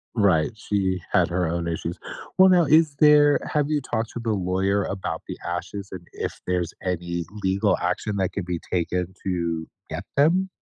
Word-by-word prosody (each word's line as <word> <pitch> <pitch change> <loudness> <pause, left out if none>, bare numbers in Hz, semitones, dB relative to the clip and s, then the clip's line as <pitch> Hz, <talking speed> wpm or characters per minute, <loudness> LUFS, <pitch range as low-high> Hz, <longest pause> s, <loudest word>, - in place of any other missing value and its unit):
Right. 95 -8 +3
She 95 -4 -1
had - - +4
her 90 -1 0
own 85 0 -2
issues. 85 +1 -3 0.4
Well, 190 0 +8
now 175 -3 +5
is 155 0 +4
there 150 -1 +6
have 150 -1 +2
you 150 -2 +1
talked 115 -2 -3
to 120 - -5
the 115 -1 -1
lawyer 95 +1 +1
about 95 -4 -4
the - - -6
ashes 95 +3 -4
and 85 -2 -9
if - - -4
there's 90 -2 -1
any 85 -2 -2 0.2
legal 100 +2 +2
action 100 +3 -1
that 95 -2 +1
could 100 -3 -4
be 90 -2 -2
taken 90 +1 -1
to 85 -3 -2 0.2
get - - -4
them? 175 +7 +3
95 Hz, 180 wpm, -24 LUFS, 85-115 Hz, 0.4 s, Well